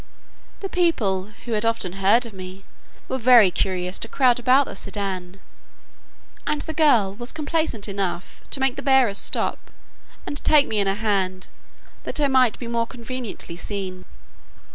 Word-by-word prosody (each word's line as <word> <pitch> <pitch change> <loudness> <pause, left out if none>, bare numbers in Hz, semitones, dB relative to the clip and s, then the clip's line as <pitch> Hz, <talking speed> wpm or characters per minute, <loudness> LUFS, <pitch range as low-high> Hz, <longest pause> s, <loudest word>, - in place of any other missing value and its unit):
The 390 - -3
people, 235 - +1 0.2
who 240 - -6
had 215 -1 +1
often 225 -6 0
heard 200 +6 +3
of 230 - -9
me, 185 0 -9 0.4
were 260 - -3
very 235 -5 +6
curious 180 0 -2
to - - -4
crowd 250 -1 +3
about 255 +3 +4
the - - -8
sedan, 190 -2 -5 1.1
and 295 - 0
the 315 - -5
girl 250 -12 +3
was 240 +4 -5
complaisant 310 -8 -1
enough 195 -3 -4
to - - -1
make 265 -1 +1
the - - -3
bearers 265 -7 +3
stop, - - -2 0.6
and - - -5
to - - -3
take 295 -2 +5
me 215 - -1
in 200 - +1
her 195 - +1
hand, 195 -3 -1 0.5
that - - -4
I 290 - +3
might 260 -4 +3
be 245 - -7
more 230 0 -1
conveniently 235 -7 -7
seen. 185 0 -6
225 Hz, 165 wpm, -23 LUFS, 195-260 Hz, 1.1 s, very